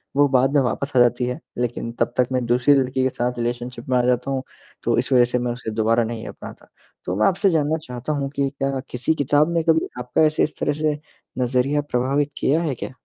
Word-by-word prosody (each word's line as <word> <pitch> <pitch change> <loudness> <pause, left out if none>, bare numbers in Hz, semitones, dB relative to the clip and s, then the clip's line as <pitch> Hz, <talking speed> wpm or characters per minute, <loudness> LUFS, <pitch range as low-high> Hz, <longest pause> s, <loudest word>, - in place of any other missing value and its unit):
वो 145 0 +5
बाद 135 +1 +3
में 145 - +4
वापस 135 +3 -2
आ - - +7
जाती 120 0 +3
है, 125 0 -3 0.2
लेकिन 120 -1 -2
तब - - +1
तक 125 - +3
मैं 125 -2 0
दूसरी 125 +4 +4
लड़की 130 -1 +1
के 130 - +2
साथ 125 -1 -2
रिलेशनशिप 120 +1 -4
में 125 - +3
आ 125 - +4
जाता 125 +2 +1
हूँ, 135 0 -2 0.4
तो - - +1
इस 125 +3 -2
वज़ह 125 -1 +6
से 125 0 -1
मैं 120 0 -1
उसे 120 -3 -6
दोबारा 115 +2 +2
नहीं 115 0 -5
अपनाता। - - -10 0.4
तो 90 - -2
मैं 110 - +3
आपसे 195 +1 +2
जानना 160 -1 +1
चाहता 125 +4 -4
हूँ 140 -2 -2
कि 140 -1 +1
क्या 135 -1 -2
किसी 125 +6 -1
किताब 145 +3 +2
में 165 - +1
कभी 160 0 +2
आपका 125 +5 0
ऐसे 155 0 +2
इस 150 - -2
तरह - - +1
से 150 -1 0 0.4
नज़रिया 130 +4 +1
प्रभावित 140 +2 0
किया 155 +5 +2
है 150 -6 -1
क्या? 130 - -7
130 Hz, 235 wpm, -22 LUFS, 120-145 Hz, 0.4 s, आ